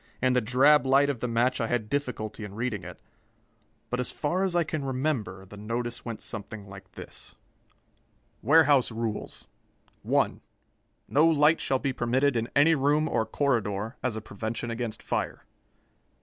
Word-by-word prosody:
In 130 0 +2
the 125 - +3
drab 130 +5 +5
light 135 +2 +4
of 130 - -7
the 125 - -2
match 120 +2 +1
I 115 - 0
had 115 -2 -1
difficulty 115 -5 -3
in 100 -1 -8
reading 115 -3 -2
it - - -9 0.9
but, 125 - -1
as 125 - -1
far 175 +6 -1
as 185 -2 0
I 175 - +4
can 155 -2 -4
remember, 130 -9 -2
the 105 +2 -12
notice 115 +3 -4
went 115 -2 -6
something 105 -2 -6
like 95 -1 -12
this: - - -11 1.1
WAREHOUSE 145 -1 +5
RULES 110 -1 -4 0.6
1. - - +1 0.7
No 150 +4 +4
light 155 0 +4
shall 135 - +1
be 135 0 -2
permitted 130 +3 +1
in 115 0 -1
any 145 +4 +6
room 150 +1 +2
or 110 - 0
corridor, 110 -4 -1
as 125 -4 -1
a 110 - -4
prevention 110 +3 -5
against 115 -1 -4
fire. - - -3
125 Hz, 165 wpm, -27 LUFS, 110-140 Hz, 1.1 s, any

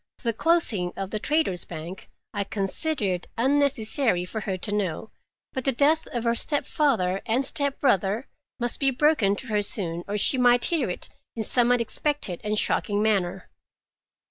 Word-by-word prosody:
The 230 -1 0
closing 220 - +1
of 195 -1 -4
the 215 - -2
Traders' 295 - 0
Bank 170 +3 -8 0.2
I 205 -1 -1
considered 200 - -2
unnecessary 260 -6 +2
for 220 +4 -5
her 190 -2 -3
to 205 +3 -4
know, 200 0 -2 0.4
but 260 - -3
the 270 - +2
death 295 +5 +2
of 240 -2 -3
her 235 -1 +2
stepfather 235 -8 0
and 245 +4 +2
stepbrother 260 - +1 0.3
must 240 0 0
be 275 - +3
broken 260 -7 +2
to 260 - -8
her 210 -1 +1
soon, 175 -4 -2
or 205 +1 -2
she 255 +6 +3
might 245 -1 +5
hear 315 - 0
it 180 - -5 0.3
in 225 - -2
some 245 +2 +3
unexpected 245 - 0
and 210 0 -1
shocking 205 0 +1
manner. 195 -4 0
225 Hz, 160 wpm, -25 LUFS, 195-270 Hz, 0.4 s, might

